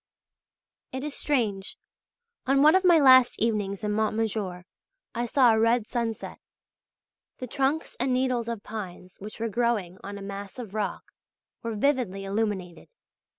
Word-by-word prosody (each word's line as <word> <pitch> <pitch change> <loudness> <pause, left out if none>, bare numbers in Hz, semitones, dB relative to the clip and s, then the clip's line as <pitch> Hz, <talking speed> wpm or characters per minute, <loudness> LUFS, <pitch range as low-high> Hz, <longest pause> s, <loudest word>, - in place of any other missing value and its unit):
It 260 +1 -5
is 300 -1 -3
strange; 215 -11 -1 0.7
on 275 +1 +4
one 310 - +7
of 375 0 +4
my 350 -2 +6
last 260 -4 +6
evenings 210 -3 -1
in 210 - -1
Mont 215 0 0
Majour 200 -5 -2 0.5
I 240 0 -2
saw 245 -2 +5
a 220 - +2
red 230 0 +3
sunset; 230 -2 -4 1.0
the 255 - -5
trunks 275 +5 -1
and 255 +2 +1
needles 250 -2 0
of 230 -3 -4
pines 185 -4 -8
which 210 +3 -9
were 230 - -1
growing 215 -5 -1
on 200 +1 -6
a 200 - -8
mass 200 +1 -7
of 225 -6 -8
rock, 215 -2 -3 0.6
were 230 -2 -4
vividly 215 -6 0
illuminated. 195 -4 -3
225 Hz, 150 wpm, -26 LUFS, 200-255 Hz, 1.0 s, one